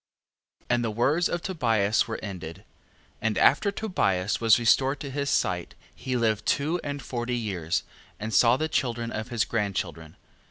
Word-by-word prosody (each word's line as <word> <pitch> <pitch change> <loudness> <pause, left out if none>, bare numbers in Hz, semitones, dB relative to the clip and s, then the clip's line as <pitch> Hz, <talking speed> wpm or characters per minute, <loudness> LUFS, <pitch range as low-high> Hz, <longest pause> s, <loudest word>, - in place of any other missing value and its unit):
14:1. - - -32
And 120 0 +2
the 115 - 0
words 140 +10 +1
of 175 - -3
Tobias 115 - +1
were 110 - -4
ended. 95 -2 -7 0.6
And 110 -3 0
after 175 - +4
Tobias 105 - 0
was 115 -1 +6
restored 130 +4 +3
to 140 - -5
his 140 +1 -2
sight, - - 0 0.2
he 130 0 -3
lived 110 -3 0
two 160 +5 +1
and 145 -2 -4
forty 120 0 -3
years, 90 -7 -2 0.4
and 110 +1 -4
saw 115 +5 +5
the 155 - -1
children 120 -5 -1
of 110 +1 -4
his 120 -3 0
grandchildren. 95 -7 -3
115 Hz, 165 wpm, -26 LUFS, 105-140 Hz, 0.6 s, was